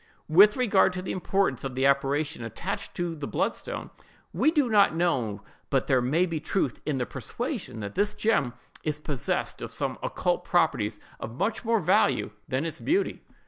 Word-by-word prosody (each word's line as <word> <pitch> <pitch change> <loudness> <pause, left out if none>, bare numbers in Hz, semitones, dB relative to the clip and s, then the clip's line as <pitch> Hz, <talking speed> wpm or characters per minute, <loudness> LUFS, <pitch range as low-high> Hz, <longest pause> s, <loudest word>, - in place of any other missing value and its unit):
With 200 +8 +7
regard 200 -6 +4
to 185 0 -4
the - - -3
importance 190 -6 0
the 135 0 -1
apparition 140 0 +1
attached 115 - -5
to 175 -2 -2
the 150 -3 -5
bloodstone, - - -2 0.4
we 240 - +3
do 300 -5 +2
not 205 -7 +4
know 125 - 0 0.3
but - - +3
that - - -21
there 130 -2 +4
may 150 +9 +2
be 165 -3 -3
truth 155 - -1
in 150 -3 0
the 125 - 0
persuasion 110 - -5
that 100 0 -5
this 205 +1 0
gem 150 - +1 0.3
is 150 -1 -2
possessed 145 -5 -2
of - - -4
some - - -3
occult - - -1
properties 105 0 +1 0.2
of 115 +2 -6
much 215 - -1
more 230 -1 +2
value 160 - +2 0.2
than 130 +4 -1
its 165 - -4
beauty. 375 +6 0
155 Hz, 180 wpm, -27 LUFS, 130-195 Hz, 0.4 s, With